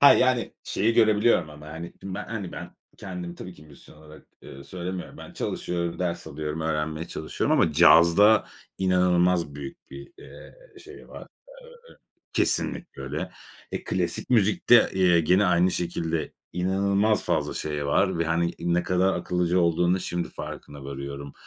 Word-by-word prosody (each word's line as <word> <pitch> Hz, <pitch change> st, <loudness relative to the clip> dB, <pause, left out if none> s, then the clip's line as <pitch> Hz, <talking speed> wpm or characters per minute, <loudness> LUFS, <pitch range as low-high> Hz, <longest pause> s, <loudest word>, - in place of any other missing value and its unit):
Ha, 140 Hz, -, +9 dB
yani, 130 Hz, -2 st, +1 dB
şeyi 115 Hz, +4 st, 0 dB
görebiliyorum 110 Hz, -5 st, +3 dB
ama, 75 Hz, 0 st, -12 dB
hani, 80 Hz, +2 st, -8 dB
şimdi 95 Hz, -1 st, -6 dB
ben, 105 Hz, -, -5 dB
hani, 105 Hz, -5 st, -6 dB
ben -, -, -8 dB, 0.3 s
kendim, 90 Hz, -2 st, -7 dB
tabii 90 Hz, +1 st, -9 dB
ki -, -, -16 dB
müzisyen 75 Hz, -2 st, -17 dB
olarak, 75 Hz, 0 st, -16 dB, 0.2 s
ııı, 70 Hz, +1 st, -11 dB
söylemiyorum. 90 Hz, +3 st, -6 dB
Ben -, -, -11 dB
çalışıyorum, 85 Hz, -1 st, -3 dB
ders 90 Hz, -2 st, -3 dB
alıyorum, 75 Hz, +2 st, -5 dB
öğrenmeye 80 Hz, +1 st, -2 dB
çalışıyorum 80 Hz, -, -1 dB
ama 80 Hz, -, +2 dB
cazda 85 Hz, +6 st, +6 dB, 0.3 s
inanılmaz 90 Hz, -4 st, +2 dB
büyük 70 Hz, -2 st, -10 dB
bir, 70 Hz, +1 st, -11 dB
eee, -, -, -13 dB, 0.3 s
şey 400 Hz, 0 st, -13 dB
var. -, -, -10 dB, 0.4 s
Eee, 485 Hz, 0 st, -17 dB, 0.4 s
kesinlikle -, -, 0 dB
öyle. -, -, -4 dB, 0.4 s
Eee, -, -, -4 dB
klasik -, -, -2 dB
müzikte, 110 Hz, +1 st, +4 dB
eee, 90 Hz, -3 st, +4 dB
gene 90 Hz, +5 st, +3 dB
aynı 90 Hz, +1 st, +3 dB
şekilde 85 Hz, -2 st, -2 dB, 0.2 s
inanılmaz 100 Hz, +3 st, +1 dB
fazla 80 Hz, -4 st, -1 dB
şey 75 Hz, -2 st, -3 dB
var 95 Hz, +4 st, +1 dB
ve, 85 Hz, -, +1 dB
hani, 85 Hz, +1 st, 0 dB
ne 85 Hz, +1 st, 0 dB
kadar 90 Hz, +2 st, +1 dB
akıllıca 90 Hz, 0 st, 0 dB
olduğunu 85 Hz, +2 st, +2 dB
şimdi 85 Hz, 0 st, -3 dB
farkına 70 Hz, -1 st, -9 dB
varıyorum. 70 Hz, +1 st, -7 dB
85 Hz, 150 wpm, -25 LUFS, 80-95 Hz, 0.4 s, Ha